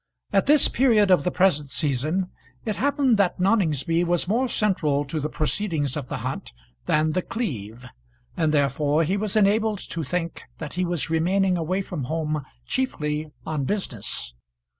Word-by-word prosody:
At 195 +3 +3
this 295 -1 +6
period 220 -6 +3
of 180 - +5
the 180 - +1
present 170 -6 +2
season 155 +7 0 0.3
it 215 - -1
happened 280 -4 +2
that 185 -3 +1
Noningsby 170 - +2
was 175 0 +1
more 240 +7 +1
central 155 - +1
to 155 +3 -3
the 150 +1 -2
proceedings 155 -3 -1
of 140 -4 -4
the - - -4
hunt - - -4 0.3
than 155 +1 +2
The 185 - 0
Cleeve, 125 - -5 0.5
and 160 -2 +1
therefore 145 +2 +2
he 180 +5 0
was 205 0 0
enabled 215 +1 +3
to 165 - -3
think 170 +3 -3 0.2
that 150 -3 -6
he 180 +1 0
was 170 -3 -1
remaining 185 +3 +2
away 180 +3 -1
from 160 -8 -5
home 155 0 -2 0.2
chiefly 155 -12 -2 0.2
on 150 -4 -2
business. 120 - -3
170 Hz, 160 wpm, -24 LUFS, 150-200 Hz, 0.5 s, this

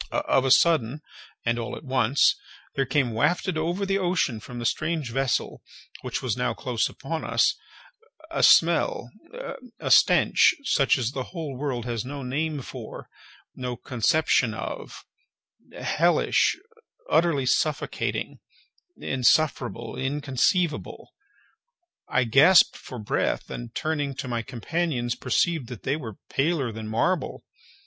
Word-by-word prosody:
Of 135 - +1
a - - +2
sudden, 150 -2 +3 0.4
and 120 0 +1
all 115 - -4
at - - -11
once, 130 -1 +3 0.4
there 135 -1 -1
came 135 -5 +1
wafted 175 - 0
over 170 +5 -1
the 195 0 0
ocean 175 - 0
from 120 +3 -10
the 120 - -5
strange 155 +1 -1
vessel 135 0 -1 0.4
(which - - -4
was - - 0
now - - -1
close - - -1
upon - - -5
us) - - +2 0.8
a - - -1
smell, 165 -7 +4 0.7
a - - -3
stench, - - +5
such 140 - +3
as 125 -2 -1
the 130 -2 -4
whole 160 -6 -6
world 130 -3 -3
has 120 -2 -3
no 140 +2 -6
name 145 +2 -2
for—no 125 0 -9
conception 125 +7 +1
of—hellish—utterly 450 - -2
suffocating—insufferable, 145 - -1
inconceivable. 145 +4 -1 1.0
I 130 - +2
gasped 140 +10 +6
for 125 - -9
breath, 105 -2 -2
and 120 -1 -7
turning 145 -3 -2
to 130 - -5
my 120 -2 -2
companions, 125 +1 -2
perceived 140 +3 0
that 125 -3 -9
they 135 - 0
were 115 -10 -7
paler 140 -3 0
than 110 0 -7
marble. 130 +9 -1
135 Hz, 120 wpm, -25 LUFS, 120-160 Hz, 1.0 s, gasped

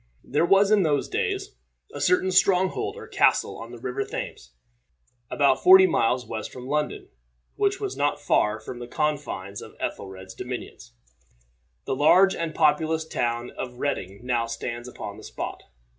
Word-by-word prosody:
There 150 +5 +1
was 195 +2 +5
in 210 -2 +5
those 150 -5 +1
days 400 -2 -2 0.4
a - - -6
certain 275 - +3
stronghold 185 0 +2
or - - -8
castle - - +2
on 115 +1 -8
the 120 - -9
River 125 +3 -3
Thames, - - -7 0.7
about 140 -2 +2
forty 190 +1 +9
miles 125 -7 +1
west 110 -1 -5
from 125 -1 -9
London, 150 - -2 0.5
which 405 -1 +1
was 405 -2 -3
not 145 0 0
far 110 -7 +1
from 120 +3 -8
the 120 - -7
confines 140 - -3
of - - -12
Ethelred's 95 -1 -6
dominions. 125 -1 -7 0.9
The - - -1
large 185 +7 +5
and 165 -2 -4
populous 160 +1 +2
town 120 -3 -2
of 125 -1 -7
Reading 100 -8 -3
now 120 -2 0
stands 120 +1 -5
upon 125 - -8
the - - -12
spot. - - -6
140 Hz, 160 wpm, -25 LUFS, 120-180 Hz, 0.9 s, forty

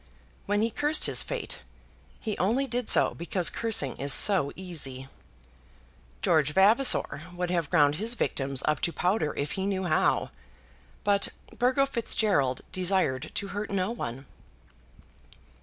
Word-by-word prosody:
When 205 +1 +1
he 230 - 0
cursed 295 +6 +1
his - - +2
fate, - - -5 0.6
he 215 -3 -3
only 235 +9 +1
did 245 -2 -3
so - - +5
because 170 +1 0
cursing 210 - +1
is 140 +2 -1
so 185 -3 +5
easy. 140 -8 -5 1.2
George 150 -3 +2
Vavasor 200 - +3
would 180 0 -3
have 170 -5 -1
ground 145 -2 +3
his 225 +4 -1
victims 135 - -1
up 150 -2 +1
to 170 - -1
powder 180 -3 0
if 145 - -3
he 190 0 -3
knew 190 -1 -2
how; 155 -4 +1 0.7
but 200 -1 +2 0.3
Burgo 255 +3 +2
Fitzgerald 210 - -1
desired 180 -7 0
to 200 - -3
hurt 205 +1 -5
no 195 +1 -1
one. 135 - -6
185 Hz, 140 wpm, -27 LUFS, 145-215 Hz, 1.2 s, so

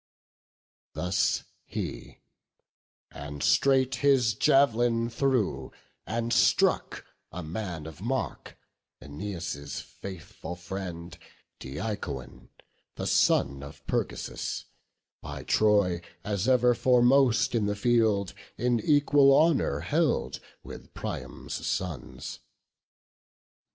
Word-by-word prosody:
Thus 90 +1 0 0.2
he: - - -6 0.9
and 75 0 -7
straight 135 -1 +3
his 135 -5 +4
jav'lin 120 -3 +3
threw, 115 - 0 0.4
and 115 +1 -1
struck - - +2 0.3
A 90 - -6
man 85 -1 -5
of 80 +2 -10
mark, 130 +5 -3 0.4
Æneas' 75 -1 -5
faithful 90 -2 -9
friend, 90 -2 -7 0.4
Deicoon, 70 - -6 0.5
the - - -4
son 70 0 +2
of 70 0 -11
Pergasus, - - -3 0.6
By - - -7
Troy, 100 -5 +3 0.2
as 100 0 -1
ever 125 -1 +5
foremost 125 0 +4
in 110 -4 +1
the 105 - -1
field, 110 -3 +2 0.2
In 120 0 +1
equal 145 +2 +4
honour 150 - +2
held 155 - 0 0.2
with - - -11
Priam's - - -6
sons. 90 -5 -4
105 Hz, 90 wpm, -28 LUFS, 85-125 Hz, 0.9 s, ever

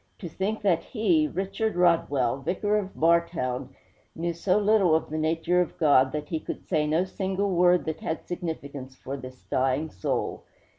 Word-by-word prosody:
'To 180 - -7
think 205 +6 -3
that 180 -5 +3
he 305 +7 +2
Richard 205 -1 -2
Rodwell, 145 -8 +2
Vicar 205 +9 0
of 200 -2 -2
Bartown 160 -6 +1 0.5
knew 170 +1 -2
so 185 +3 +1
little 205 -5 +4
of 160 - -1
the 155 - -2
nature 165 +3 +1
of 175 - -3
God 140 -5 +4
that 150 -1 -4
he 160 - -1
could - - -7
say 155 -4 +1
no 160 +4 +2
single 190 +1 -2
word 180 0 +4
that 160 -1 -3
had 160 - -4
significance 145 -7 -6
for 135 +1 -6
this 130 -1 -10
dying 135 +4 0
soul! 90 - -2
170 Hz, 170 wpm, -26 LUFS, 145-190 Hz, 0.5 s, little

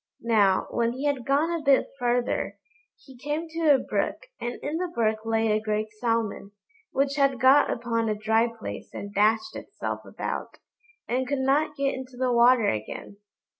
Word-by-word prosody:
Now, 205 -5 +3
when 235 0 0
he 265 +3 -5
had 280 -5 -1
gone 290 +5 +2
a 335 -1 -2
bit 280 -2 +3
further, 245 0 0 0.5
he 265 - -14
came 295 +6 -3
to 325 -1 0
a 285 - +7
brook, - - -2 0.2
and 240 0 -3
in 300 +3 -2
the 365 +1 -1
brook 220 -9 0
lay 225 -1 +2
a 215 0 +1
great 215 0 -2
Salmon, 225 -4 -1 0.4
which 275 +1 0
had 275 -3 +2
got 265 +3 +6
upon 230 -1 -1
a 215 - 0
dry 220 +2 +2
place 230 -2 -8
and 200 0 -6
dashed 220 - +2
itself - - -5
about, - - -5 0.5
and 255 +1 -1
could 280 - -1
not 295 +3 +1
get 275 -1 0
into 260 -1 -8
the 255 0 +1
water 240 -2 +5
again. 110 - -5
245 Hz, 175 wpm, -26 LUFS, 225-280 Hz, 0.5 s, a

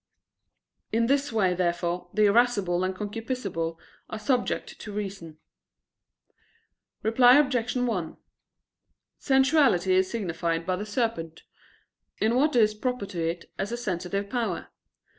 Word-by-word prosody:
In 230 +1 +2
this 280 +2 +1
way, 195 -5 +2
therefore, 175 0 -1
the 215 0 +3
irascible 200 -5 +2
and 185 0 -1
concupiscible 205 -6 -4 0.3
are 220 - -5
subject 250 +3 -1
to 210 - -8
reason. 195 -6 -6 1.7
Reply 245 +4 +6
Obj. 255 -5 +1
1: 225 -10 -1 1.0
Sensuality 265 - +3
is 185 0 +3
signified 170 -6 -2
by 185 +1 0
the 205 +3 -5
serpent, 205 -8 -2 0.7
in 220 +2 +1
what 280 +3 +2
is 215 -3 +4
proper 250 0 -3
to 185 -4 -5
it 165 +1 -4
as 200 +3 -2
a 235 - -2
sensitive 200 -2 -3
power. 220 -6 -3
210 Hz, 125 wpm, -26 LUFS, 180-245 Hz, 1.7 s, Reply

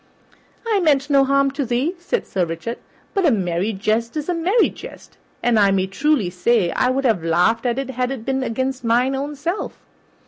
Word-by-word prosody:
"I 440 -3 +1
meant 290 -4 +2
no 275 -1 +5
harm 275 0 +2
to 280 - -2
thee," 255 +7 0
said 370 +7 -2
Sir 185 - -1
Richard, 170 +8 -4 0.3
"but 390 - +1
a 325 - +5
merry 190 -3 0
jest 220 +6 -1
is 305 +3 -4
a - - +2
merry 365 +7 +2
jest, - - -12 0.3
and 235 -2 +3
I 200 -1 +5
may 195 -1 +1
truly 230 -1 0
say 185 0 +1
I 250 - +1
would 270 +1 0
have 215 -9 +2
laughed 180 +9 +2
at 240 +1 0
it 270 -1 -3
had 250 0 -1
it 260 -4 -6
been 265 0 -1
against 260 +2 -2
mine 240 +3 +2
own 285 +2 -4
self." 335 +8 -4
255 Hz, 205 wpm, -21 LUFS, 215-280 Hz, 0.3 s, no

